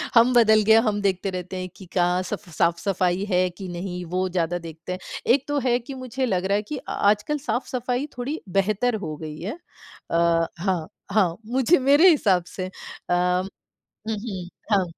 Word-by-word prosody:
हम 235 +2 +6
बदल 220 -2 +6
गए 220 - +8
है। 225 - +7
हम 205 -1 0
देखते 195 -1 0
रहते 185 0 -5
हैं 185 0 -4
कि 190 - -12
कहाँ 180 0 +2
सफ 205 0 -6
साफ-सफ़ाई 180 +2 +1
है 185 0 +2
कि 180 +2 -9
नहीं, 180 +1 -5
वो 185 +2 -1
ज़्यादा 175 -1 0
देखते 165 +1 -8
हैं। 185 - -5 0.3
एक 275 +1 0
तो 290 0 0
है 245 -1 +3
कि 250 +3 -9
मुझे 255 0 -3
लग 190 -6 0
रहा 200 +1 +2
है 210 - +1
कि 295 +7 -5
अ - - -10
आजकल 210 +9 +2
साफ़-सफ़ाई 255 -1 -2
थोड़ी 275 +6 -3 0.2
बेहतर 215 +5 +1
हो 155 -1 -4
गई 155 -1 -7
है। 210 - -5 0.5
अ, 170 - +3 0.4
हाँ, 180 -4 -1 0.2
हाँ। 185 -5 +3
मुझे 260 +8 +3
मेरे 285 +7 +6
हिसाब 195 - +3
से 185 - -5
अ, - - -8 0.4
हुँ, 180 +2 0 0.5
हुँ। 200 -5 -5 0.3
हाँ, 195 -2 +4
195 Hz, 190 wpm, -24 LUFS, 180-245 Hz, 0.5 s, गए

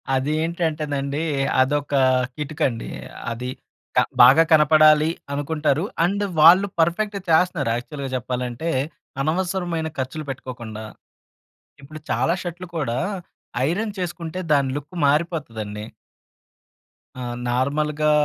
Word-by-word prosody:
అది 135 +3 0
ఏంటంటేనండి. 155 -4 -2 0.4
అదొక 145 +2 0 0.4
కిటుకండి. 150 -5 -2 0.4
అది 125 +2 -4 0.5
క - - +6 0.2
బాగా 135 +7 +8
కనపడాలి 155 0 +6 0.2
అనుకుంటారు 150 +1 0 0.2
అండ్ 200 +4 +1 0.2
వాళ్ళు 180 +5 +8
పర్ఫెక్ట్‌గా 200 +5 +1
చేస్తున్నారు. 165 -5 +3
యాక్చువల్‌గా 140 +2 -6
చెప్పాలంటే 125 +4 -3 0.5
అనవసరమైన 175 +1 -1
ఖర్చులు 135 +4 -4
పెట్టుకోకుండా 120 -4 -7 1.0
ఇప్పుడు 155 +3 -10
చాలా 130 +8 +2
షర్ట్‌లు 175 +1 -6
కూడా 120 -6 -1 0.7
ఐరన్ 205 +6 -1
చేసుకుంటే 175 -1 -4
దాని 140 -2 +3
లుక్ 145 +4 -9
మారిపోతదండి. 115 - -2 1.3
ఆ! - - -5 0.3
నార్మల్‌‌గా 150 +4 +1
150 Hz, 95 wpm, -22 LUFS, 130-165 Hz, 1.3 s, బాగా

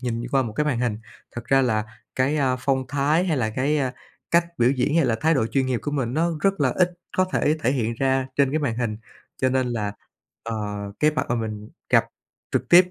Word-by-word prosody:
nhìn 120 -2 -2
qua 135 -1 +3
một 115 - -5
cái 150 +7 0
màn 130 -5 0
hình. 120 -4 -1 0.3
Thật 120 - -7
ra 135 +1 +3
là 110 -4 +1 0.3
cái, 135 +4 +1
à, 130 -3 +1
phong 130 0 0
thái, 145 +5 +2
hay 160 -5 0
là 110 -4 0
cái, 140 +6 0
à, 130 -2 -1 0.4
cách 170 0 +4
biểu 120 +1 +4
diễn, 140 +4 +1
hay 165 - +4
là 115 - +2
thái 160 +1 +3
độ 115 -5 +1
chuyên 130 +2 0
nghiệp 125 -4 -1
của 145 - -2
mình 130 -4 -2
nó 170 +3 +2
rất 195 -3 +1
là 135 - +4
ít 180 +6 +2 0.3
có 185 - +4
thể 150 +2 +2
thể 130 - +2
hiện 115 -3 -1
ra 130 +1 +1
trên 140 -2 +3
cái 155 - +2
màn 140 -7 -1
hình. 115 -3 -2 0.4
Cho 130 - +2
nên 130 -1 +1
là, 105 -4 -2 0.5
ờ, 115 0 -4 0.5
cái 155 0 +5
mặt 155 - -2
mà 120 - +1
mình 110 -2 -4 0.2
gặp - - +5 0.5
trực - - 0
tiếp 180 +1 +7
130 Hz, 240 wpm, -24 LUFS, 120-150 Hz, 0.5 s, tiếp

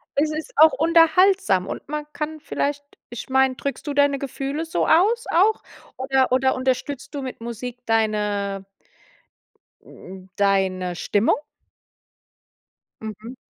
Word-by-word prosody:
Es 305 +2 +1
ist 310 +10 -6
auch 315 -2 +7
unterhaltsam 330 - +3
und - - -7
man 300 0 -4
kann 310 +1 -4
vielleicht 290 -1 -3 0.3
ich 240 +2 -8
meine, 265 0 +3
drückst 280 +2 -5
du 290 - -3
deine 285 0 +3
Gefühle 275 +3 -4
so 325 - -1
aus 430 +9 +3
auch? 405 +6 +3 0.4
Oder 265 0 +1
oder 260 +1 +2
unterstützt 260 +2 -3
du 280 - -3
mit 255 -3 -7
Musik 240 +1 -7
deine 210 -3 -1 1.2
hm, 190 0 -13
deine 190 -3 +1
Stimmung? 205 +5 +1 1.6
Mhm. 220 +3 -8
265 Hz, 125 wpm, -22 LUFS, 220-305 Hz, 1.6 s, auch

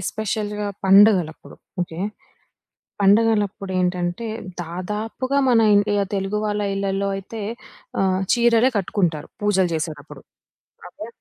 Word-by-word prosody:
ఎస్పెషల్‌గా 210 +1 -3 0.2
పండగలప్పుడు 190 -4 +4 0.3
ఓకే. 170 -1 -7 1.0
పండగలప్పుడేంటంటే, 195 -2 +1 0.4
దాదాపుగా 210 +10 -3
మన 235 -2 +5 0.2
ఇండియా 205 0 +2
తెలుగు 195 +1 -1
వాళ్ళ 210 0 -1
ఇళ్ళల్లో 195 0 -1
అయితే 205 +3 -7 0.6
ఆహ్, 190 -1 +1
చీరలే 240 +1 +4
కట్టుకుంటారు 175 -5 -1
పూజలు 190 -3 +2
జేసేటప్పుడు. 160 -1 -6 0.7
ఓకే. 215 - -9
200 Hz, 90 wpm, -22 LUFS, 185-215 Hz, 1.0 s, మన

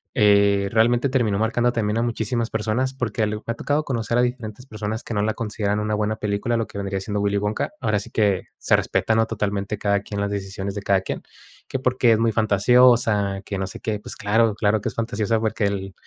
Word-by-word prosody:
eh, 100 -3 +4
realmente 120 +3 +3
terminó 115 -6 +1
marcando 120 +2 +1
también 110 -2 -1
a - - +2
muchísimas 115 0 -1
personas? 110 +4 -1
Porque 120 -4 -3
ali 105 0 0
me 105 - -7
ha 115 - 0
tocado 145 +5 0
conocer 115 -2 -1
a - - +4
diferentes 120 -1 -3
personas 110 -1 -4
que - - -6
no 105 - +1
la 110 +1 0
consideran 105 -2 -2
una 105 0 -1
buena 105 +1 0
película, 105 +3 -1
lo 115 - -1
que - - -10
vendría 100 -1 -2
siendo 105 +1 -3
Willy 100 0 +1
Wonka. 105 - -1
Ahora 110 -3 +1
sí - - -9
que, 100 -4 +1
se - - +3
respeta, 110 - +1
¿no?, 115 0 +3
totalmente, 105 -1 -2
cada 100 0 +1
quien 100 0 -6
las 100 0 -1
decisiones 100 0 -4
de 100 - -4
cada 100 -1 +2
quien. - - -5 0.5
Que - - -2
porque 125 -2 +2
es 110 - +1
muy 115 0 +2
fantasiosa, 110 -2 +3
que 100 - -4
no 95 - -2
sé 95 - -9
qué, 105 -2 -2
pues 125 +4 -8
claro, 110 +1 +2
claro 105 0 +1
que - - -2
es - - -11
fantasiosa 110 -1 0
porque 110 -1 -1
el 100 -1 -2
110 Hz, 230 wpm, -23 LUFS, 100-115 Hz, 0.5 s, eh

